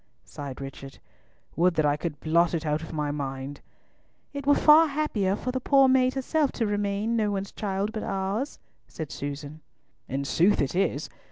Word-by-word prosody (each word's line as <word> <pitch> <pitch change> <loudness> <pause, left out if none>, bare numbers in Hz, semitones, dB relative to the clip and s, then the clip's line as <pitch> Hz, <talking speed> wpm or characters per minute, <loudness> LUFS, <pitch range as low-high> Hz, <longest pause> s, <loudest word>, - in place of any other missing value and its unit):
sighed 140 -3 -8
Richard. 135 0 -8 0.6
"Would 175 +1 +3
that 155 -2 +2
I 145 0 +3
could 150 -1 -5
blot 170 +2 +2
it 160 -1 -3
out 150 0 0
of 160 - -8
my 150 -2 -2
mind." 140 -1 -5 0.7
"It 280 -1 -6
were 285 - +6
far 310 +2 +7
happier 275 -10 0
for 250 +4 -3
the 260 - -2
poor 275 +1 +5
maid 255 0 +3
herself 280 +2 +1
to 230 - -1
remain 205 +2 -1
no 215 -2 +1
one's 195 -1 -3
child 200 0 -2
but 220 - -4
ours," 195 +8 -2 0.3
said 155 -3 -7
Susan. 145 +2 -6 0.5
"In 140 +1 -2
sooth 175 +8 +3
it 140 +3 0
is! 195 +2 0
190 Hz, 180 wpm, -26 LUFS, 150-235 Hz, 0.7 s, far